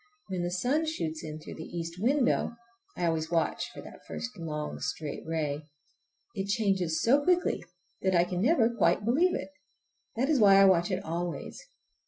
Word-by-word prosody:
When 185 Hz, -2 st, -2 dB
the 175 Hz, -, -1 dB
sun 255 Hz, -, 0 dB
shoots 160 Hz, -, -3 dB
in 155 Hz, 0 st, -6 dB
through 155 Hz, -, -9 dB
the 160 Hz, +2 st, -7 dB
east 170 Hz, +2 st, -5 dB
window—I 235 Hz, -5 st, -1 dB
always 160 Hz, -1 st, 0 dB
watch 165 Hz, -2 st, 0 dB
for -, -, -10 dB
that -, -, -12 dB
first 245 Hz, 0 st, -5 dB
long, 155 Hz, -4 st, -4 dB
straight 150 Hz, -3 st, -4 dB
ray—it 155 Hz, -, -6 dB
changes 195 Hz, -6 st, +1 dB
so 275 Hz, +5 st, +4 dB
quickly 360 Hz, +2 st, +2 dB, 0.4 s
that 190 Hz, -1 st, +2 dB
I 170 Hz, -, +5 dB
never 230 Hz, -, +3 dB
can 235 Hz, 0 st, -5 dB
quite 210 Hz, -, +3 dB
believe 325 Hz, +11 st, +3 dB
it. -, -, -4 dB, 0.7 s
That 250 Hz, +4 st, +1 dB
is 300 Hz, -3 st, +3 dB
why 200 Hz, -3 st, +7 dB
I 195 Hz, -, +8 dB
watch 175 Hz, -2 st, +4 dB
it 190 Hz, 0 st, -2 dB
always. 170 Hz, -, -4 dB
190 Hz, 170 wpm, -29 LUFS, 165-235 Hz, 0.7 s, I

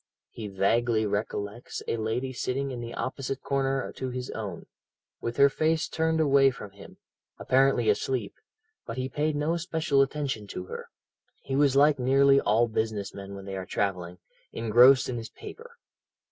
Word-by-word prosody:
He 110 Hz, -2 st, -7 dB
vaguely 110 Hz, +3 st, +1 dB
recollects 105 Hz, +2 st, -4 dB
a -, -, 0 dB
lady 115 Hz, +4 st, -2 dB
sitting 135 Hz, +2 st, -2 dB
in 120 Hz, -2 st, -5 dB
the 120 Hz, 0 st, -7 dB
opposite 135 Hz, +2 st, -4 dB
corner 135 Hz, -1 st, -1 dB
to 130 Hz, -, -3 dB
his 125 Hz, 0 st, -5 dB
own, 100 Hz, -6 st, -6 dB, 0.6 s
with 115 Hz, 0 st, -4 dB
her 140 Hz, -, +7 dB
face 155 Hz, +3 st, 0 dB
turned 160 Hz, 0 st, 0 dB
away 140 Hz, -3 st, +5 dB
from 105 Hz, -6 st, -8 dB
him, 100 Hz, 0 st, -14 dB, 0.4 s
apparently 135 Hz, +1 st, +2 dB
asleep, 430 Hz, 0 st, 0 dB, 0.5 s
but 115 Hz, -, -6 dB
he 130 Hz, 0 st, -2 dB
paid 150 Hz, +3 st, -1 dB
no 155 Hz, +4 st, 0 dB
special 160 Hz, -4 st, +1 dB
attention 135 Hz, -6 st, -2 dB
to 90 Hz, -, -6 dB
her. -, -, -8 dB, 0.5 s
He 135 Hz, -, -3 dB
was 140 Hz, -1 st, +3 dB
like 145 Hz, 0 st, +5 dB
nearly 135 Hz, +2 st, +4 dB
all 115 Hz, +3 st, +3 dB
business 110 Hz, -3 st, -2 dB
men 100 Hz, 0 st, -8 dB
when 100 Hz, 0 st, -9 dB
they 95 Hz, -1 st, -5 dB
are 95 Hz, -1 st, -5 dB
travelling 90 Hz, -3 st, -2 dB, 0.3 s
engrossed 120 Hz, +4 st, +5 dB
in 125 Hz, -, -3 dB
his 115 Hz, 0 st, -6 dB
paper. 475 Hz, -, -12 dB
130 Hz, 165 wpm, -27 LUFS, 110-140 Hz, 0.6 s, her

